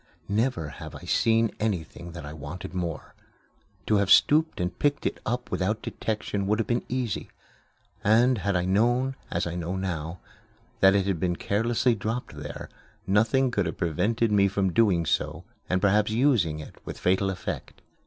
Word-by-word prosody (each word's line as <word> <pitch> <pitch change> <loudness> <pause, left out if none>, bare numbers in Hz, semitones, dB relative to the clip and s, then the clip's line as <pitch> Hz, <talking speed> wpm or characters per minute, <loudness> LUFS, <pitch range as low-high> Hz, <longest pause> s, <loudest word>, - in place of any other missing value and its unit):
Never 105 - 0
have - - -9
I - - -9
seen 115 -1 +2
anything 85 -5 -3
that 85 -4 -7
I 75 - -7
wanted 80 +5 -7
more. 85 -5 -4 0.7
To 105 - +3
have 100 -1 +1
stooped 160 +2 +5
and 90 0 -3
picked 145 0 +1
it - - -1
up 125 +2 -2
without 105 +4 -1
detection 105 -2 -3
would 105 +1 +2
have 115 - 0
been 120 0 0
easy; 125 -5 -2 0.7
and 115 +3 +4
had 100 +1 0
I 90 0 +1
known, 120 +7 +2
as 85 - -1
I 85 - -3
know 90 +1 -3
now, 85 -3 -3 0.6
that 95 +1 +6
it 100 -2 +2
had 95 -4 -1
been 90 +1 0
carelessly 115 +6 +1
dropped 110 -3 -4
there, 75 0 -7 0.4
nothing 115 +7 +3
could 100 -5 0
have - - -5
prevented 105 +8 +1
me 100 -1 +4
from 95 -2 0
doing 95 -7 +3
so - - -1 0.3
and 90 - +2
perhaps 105 +2 +3
using 110 - +2
it 75 - -11
with - - -7
fatal 95 +2 +2
effect. 95 -2 -6
100 Hz, 175 wpm, -26 LUFS, 90-115 Hz, 0.7 s, that